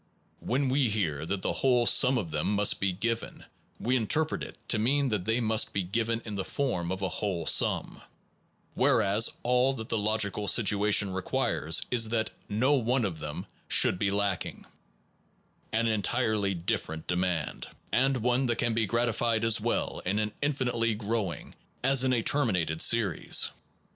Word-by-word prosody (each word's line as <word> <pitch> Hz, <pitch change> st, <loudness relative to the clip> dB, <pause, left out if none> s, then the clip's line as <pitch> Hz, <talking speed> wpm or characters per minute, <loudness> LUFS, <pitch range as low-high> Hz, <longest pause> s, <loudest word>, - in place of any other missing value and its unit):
When 135 Hz, +3 st, -1 dB
we 130 Hz, -2 st, +2 dB
hear 80 Hz, -8 st, -2 dB
that 95 Hz, 0 st, -3 dB
the -, -, 0 dB
whole 125 Hz, -3 st, +2 dB
sum 130 Hz, +2 st, +5 dB
of 90 Hz, -9 st, -4 dB
them 75 Hz, +7 st, -1 dB
must 105 Hz, 0 st, +3 dB
be 95 Hz, -1 st, 0 dB
given, 115 Hz, +5 st, -4 dB, 0.3 s
we 125 Hz, +3 st, 0 dB
interpret 155 Hz, +7 st, 0 dB
it -, -, -8 dB
to 115 Hz, -, +2 dB
mean 135 Hz, +5 st, +1 dB
that 105 Hz, -5 st, -2 dB
they 115 Hz, +2 st, +1 dB
must 110 Hz, -2 st, +1 dB
be 100 Hz, -, -1 dB
given 115 Hz, +5 st, -2 dB
in 105 Hz, -, -6 dB
the 100 Hz, -1 st, -3 dB
form 95 Hz, -9 st, -2 dB
of 95 Hz, +1 st, -4 dB
a -, -, +1 dB
whole 90 Hz, -6 st, -3 dB
sum, -, -, +1 dB, 0.7 s
whereas 105 Hz, +1 st, +2 dB
all 125 Hz, +2 st, +2 dB
that 110 Hz, -3 st, -8 dB
the 115 Hz, -, 0 dB
logical 105 Hz, -1 st, -1 dB
situa 105 Hz, 0 st, +3 dB
tion 100 Hz, -2 st, +2 dB
requires 85 Hz, -3 st, 0 dB
is 115 Hz, -3 st, +3 dB
that 110 Hz, -1 st, -1 dB, 0.2 s
no 120 Hz, +8 st, +2 dB
one 125 Hz, -2 st, +1 dB
of 85 Hz, -5 st, -4 dB
them 75 Hz, -1 st, -6 dB, 0.2 s
should 90 Hz, -, +3 dB
be 105 Hz, -, +1 dB
lacking, 100 Hz, -2 st, -2 dB, 1.1 s
an 115 Hz, +1 st, 0 dB
entirely 110 Hz, -2 st, 0 dB
different 80 Hz, -2 st, -3 dB
demand, 90 Hz, -5 st, -2 dB, 0.2 s
and 135 Hz, +2 st, +2 dB
one 125 Hz, +2 st, 0 dB
that 120 Hz, -, 0 dB
can 120 Hz, -, 0 dB
be 110 Hz, -1 st, 0 dB
gratified 115 Hz, +1 st, 0 dB
as 115 Hz, -1 st, +3 dB
well -, -, -2 dB
in 95 Hz, +3 st, -1 dB
an 105 Hz, 0 st, -1 dB
infinitely 125 Hz, -6 st, 0 dB
growing 105 Hz, -4 st, -4 dB, 0.3 s
as 135 Hz, 0 st, +3 dB
in 130 Hz, -, +1 dB
a 120 Hz, -3 st, +1 dB
terminated 90 Hz, -, +1 dB
series. 110 Hz, -8 st, +3 dB
110 Hz, 170 wpm, -28 LUFS, 95-120 Hz, 1.1 s, sum